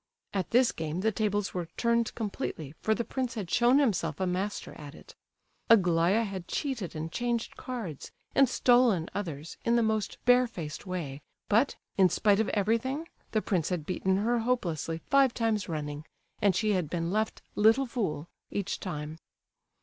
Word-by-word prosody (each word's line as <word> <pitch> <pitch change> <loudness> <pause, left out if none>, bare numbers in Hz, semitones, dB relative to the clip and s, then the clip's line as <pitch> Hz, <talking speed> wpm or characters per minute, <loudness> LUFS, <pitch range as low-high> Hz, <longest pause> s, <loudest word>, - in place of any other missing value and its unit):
At 190 -4 -1
this 245 0 +4
game 160 +2 -3
the 220 +2 +2
tables 205 -1 -1
were 175 -2 -3
turned 235 -1 +1
completely, 200 - -4
for 220 - +2
the 235 - -1
prince 255 0 -3
had 195 -6 -5
shown 245 +2 +5
himself 185 - +1
a 190 - +1
master 185 +3 -2
at 145 0 -10
it. - - -14 0.6
Aglaya 180 0 +4
had 190 -4 -5
cheated 245 - -3
and 160 +1 -4
changed 240 +3 -2
cards, 225 - -6 0.2
and 275 -3 +5
stolen 240 -10 +3
others, 165 -6 -5
in 235 - +2
the 235 - +3
most 220 -1 -1
bare 250 0 +6
faced 165 -5 -7
way, 150 -7 -4 0.3
but, 230 +7 +3 0.2
in 185 -1 +7
spite 205 +3 +3
of 220 - +1
everything 230 +10 0 0.2
the 215 - 0
prince 175 -6 0
had 175 -5 -2
beaten 190 +1 0
her 235 +4 +1
hopelessly 180 -9 -1
five 275 -3 +5
times 225 -4 0
running, 150 -2 -4 0.4
and 200 -3 +4
she 215 +3 +1
had 180 -6 0
been 170 0 -2
left 215 +2 -1
"little 225 +6 +4
fool" 180 - -3 0.2
each 200 -1 -3
time. 155 -3 -5
205 Hz, 170 wpm, -29 LUFS, 170-235 Hz, 0.6 s, in